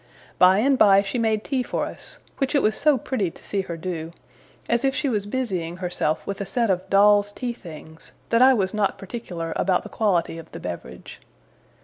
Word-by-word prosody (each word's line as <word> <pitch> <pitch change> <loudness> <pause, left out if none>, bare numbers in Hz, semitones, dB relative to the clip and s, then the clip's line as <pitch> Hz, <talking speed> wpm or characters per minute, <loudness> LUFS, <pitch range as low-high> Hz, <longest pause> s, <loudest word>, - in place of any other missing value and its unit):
By 185 +1 +6
and 265 +5 +2
by 200 -1 +6
she 200 +5 -3
made 220 -2 +1
tea 270 -3 -1
for 245 - -2
us; - - -8 0.2
which 270 +1 0
it 285 - +3
was 215 - +3
so 295 -1 +3
pretty 215 -6 -2
to - - -17
see 200 - -1
her 170 -3 -6
do, 165 -1 -5 0.6
as 235 +2 +1
if 270 0 +1
she - - -1
was 210 -5 -1
busying 190 -9 -3
herself 175 -4 -1
with 200 +1 -4
a - - -2
set 230 +1 +1
of 185 +1 -2
doll's 205 +1 +5
tea 240 +3 -4
things, 160 -5 -12 0.2
that 230 +1 +3
I 260 0 +7
was 190 -3 -1
not 210 -2 0
particular 180 -6 -6
about 185 -1 +1
the - - -9
quality 175 -6 0
of 165 - -13
the - - -7
beverage. 90 -1 -8
200 Hz, 210 wpm, -23 LUFS, 180-235 Hz, 0.6 s, I